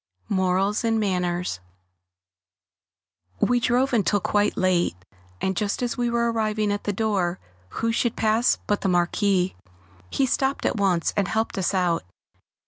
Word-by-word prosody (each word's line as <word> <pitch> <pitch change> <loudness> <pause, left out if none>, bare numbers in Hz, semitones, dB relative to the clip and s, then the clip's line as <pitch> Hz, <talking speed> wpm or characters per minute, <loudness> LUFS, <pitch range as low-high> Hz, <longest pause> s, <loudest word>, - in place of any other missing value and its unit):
[Sidenote: 205 - 0
Morals 190 +4 +1
and 225 -1 +1
Manners] 180 - -1 1.8
We 245 0 +3
drove 250 +2 +1
until 205 -2 +2
quite 205 +2 +1
late, 180 - +2 0.4
and 190 0 -1
just 205 +5 -1
as 240 - -1
we 240 -1 0
were 235 0 +1
arriving 215 -2 0
at 205 - -3
the 205 - +1
door, 195 -4 0 0.3
who 230 - -1
should 235 0 0
pass 220 +2 +2
but 205 - 0
the 195 - 0
Marquis? 180 +1 +1 0.5
He 270 - +1
stopped 265 +2 0
at - - 0
once 185 -4 +1
and 200 -1 +1
helped 220 +2 -1
us 190 +1 0
out. 175 -3 +1
205 Hz, 150 wpm, -24 LUFS, 185-230 Hz, 1.8 s, We